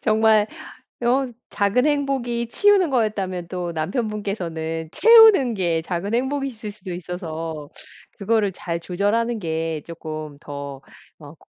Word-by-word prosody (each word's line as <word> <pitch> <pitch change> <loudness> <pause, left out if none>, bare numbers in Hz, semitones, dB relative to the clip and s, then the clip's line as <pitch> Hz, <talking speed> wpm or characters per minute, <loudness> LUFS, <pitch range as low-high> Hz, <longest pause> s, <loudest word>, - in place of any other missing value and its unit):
정말 220 -1 +4 0.6
어 255 +3 +2 0.2
작은 205 +7 +2
행복이 265 -5 0
치우는 405 +2 +4
거였다면 195 -8 -1
또 175 -1 -4
남편 185 +9 -2
분께서는 165 -6 -4
채우는 445 - +7
게 170 -5 0
작은 180 +5 -3
행복이실 265 -3 -2
수도 200 -3 -8
있어서 165 -4 -6 0.5
그거를 215 0 +1
잘 170 -2 -4
조절하는 205 +7 0
게 160 -3 -3
쪼끔 155 -3 -7
더 140 -2 -7 0.4
어 150 -1 -12
200 Hz, 260 characters per minute, -22 LUFS, 165-235 Hz, 0.6 s, 채우는